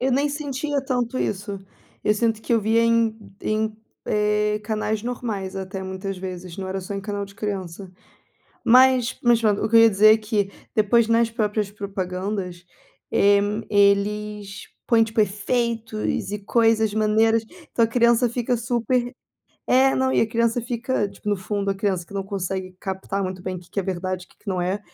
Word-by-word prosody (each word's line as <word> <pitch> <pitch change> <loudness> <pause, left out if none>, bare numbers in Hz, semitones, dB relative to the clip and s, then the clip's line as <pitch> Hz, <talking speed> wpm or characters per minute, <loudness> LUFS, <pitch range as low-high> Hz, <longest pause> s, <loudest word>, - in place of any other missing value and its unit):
Eu 260 +2 +1
nem 280 +3 +2
sentia 290 0 -2
tanto 250 -1 -1
isso. 200 0 -3 0.5
Eu 210 - +3
sinto 220 0 0
que - - -2
eu 230 - +4
vi 220 +2 +2
em 230 -1 +3 0.2
em, 215 0 -1 0.3
eh, 210 0 +1
canais 215 0 -2
normais, 225 -6 -4
até 190 0 -5
muitas 190 0 -5
vezes 180 -2 -7
não 190 -1 -5
era 190 +1 -3
só 190 +2 -6
em 195 - -3
canal 205 0 -4
de 195 - -15
criança. 195 -3 -5 0.7
Mas 255 0 +5
mas 240 -2 +4
pronto, 210 -3 +2
o - - +1
que 230 - +4
eu - - +9
ia 225 0 +7
dizer 215 +2 +6
é - - +3
que, 210 -2 -1 0.2
depois 220 +2 +3
nas 230 0 +3
próprias 210 -2 -1
propagandas, 190 -2 -4 0.5
eh 200 0 +4
hum, 210 +2 -2
eles 205 0 +1 0.2
põem 225 -1 +4
tipo 225 0 -1
efeitos 215 0 -1
e 210 - -2
coisas 225 -1 +3
maneiras, 220 +1 +3 0.3
então 230 - +3
a - - 0
criança 235 +1 +3
fica 245 +1 -1
super 240 +1 -1 0.5
é, 265 +1 +4
não, 260 0 +1
e - - +3
a - - +1
criança 230 0 +1
fica, 240 -2 -1
tipo 200 +1 -9
no 205 - +2
fundo 200 +1 -2
a 195 - 0
criança 190 -3 -1
que 200 - -13
não 195 - -1
consegue 190 -1 -4
captar 190 +1 -3
muito 185 -1 -4
bem 185 0 -4
o - - -8
que 180 +3 -8
é - - -3
verdade, 185 0 -3
o - - -36
que - - -25
que - - -13
não 185 -2 0
é. 190 +3 -1
210 Hz, 190 wpm, -23 LUFS, 195-230 Hz, 0.7 s, eu